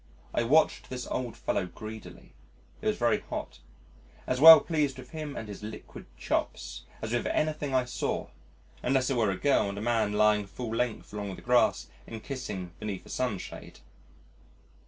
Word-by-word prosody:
I - - +2
watched 145 +7 +3
this 125 -1 -5
old 120 -3 -4
fellow 90 - -1
greedily 110 +4 -10 0.5
(it - - -3
was - - +1
very - - +2
hot), - - -6 0.7
as 130 +1 -1
well 160 0 +12
pleased 145 -4 -1
with 125 -1 -11
him 155 -3 -5
and 110 - -5
his 100 -1 -8
liquid 105 +1 -9
"chops" - - -3 0.2
as 110 +1 -3
with 120 - 0
anything 150 -3 0
I 130 -1 +3
saw, 125 - -3 0.5
unless 130 +1 +1
it - - +1
were 115 -4 +2
a 95 - -1
girl 140 -6 +2
and 100 - -6
a - - -4
man 110 -2 +1
lying 105 -1 +3
full 115 +2 -5
length 120 -3 -2
along 100 -2 -4
the - - -13
grass 125 0 +3 0.2
and 110 -1 -8
kissing 105 -10 -5
beneath 105 -4 -5
a - - -14
sunshade. 115 -7 -4
120 Hz, 175 wpm, -29 LUFS, 105-130 Hz, 0.7 s, well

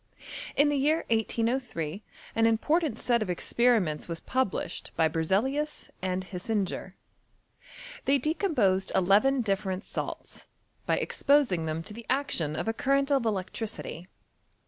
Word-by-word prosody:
In 290 +1 +5
the 290 - +1
year 305 +4 +2
1803 225 - -1 0.3
an 225 0 +3
important 300 +8 +1
set 240 -2 +1
of 215 - -1
experi 235 +7 +3
ments 155 -6 -3
was 165 -1 -4
published 260 -6 -2
by 160 - +4
Berzeliua 215 - -1
and 185 0 -1
Hisinger. 190 0 -3 1.1
They 275 +1 +4
decomposed 275 - +1
eleven 210 +9 +4
different 195 -2 -1
salts, - - -6 0.4
by - - +2
exposing 245 - +2
them 160 +1 -2
to 210 - -8
the 230 +1 -10
action 245 - +1
of - - -3
a 225 - +1
current 275 +3 +1
of 270 -5 +3
electricity. 195 -3 -4
225 Hz, 130 wpm, -28 LUFS, 185-270 Hz, 1.1 s, In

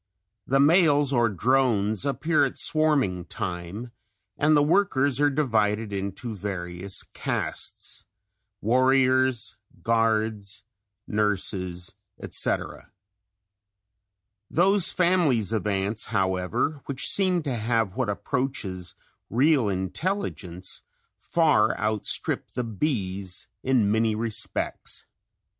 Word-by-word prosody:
The 135 +1 +2
males 145 -2 +4
or 120 -2 +3
drones 110 -1 +1
appear 145 +3 +1
at 135 - -1
swarming 140 - +1
time 90 +8 -6 0.4
and 150 +1 +3
the 145 - +4
workers 145 -6 +2
are 145 - +5
divided 110 -7 0
into 100 +4 -4
various 95 -1 -3
castes - - -3 0.6
warriors, 130 0 +2 0.3
guards, 110 -3 0 0.4
nurses, 95 -4 -1 0.3
etc. - - -2 1.6
Those 190 +3 +3
families 165 - +2
of 105 -2 -1
ants, 100 +2 -1
however, 100 +8 -1
which 140 -1 +1
seem 185 -4 +2
to 135 -4 -2
have 115 -3 0
what 125 -4 -1
approaches 100 -4 -2 0.3
real 130 -1 +3
intelligence, 95 - -3 0.4
far 155 -10 +2
outstrip 105 +1 0
the 125 - -2
bees 100 - -2
in 125 -6 +2
many 110 0 +2
respects. 110 0 -2
115 Hz, 95 wpm, -25 LUFS, 100-140 Hz, 1.6 s, are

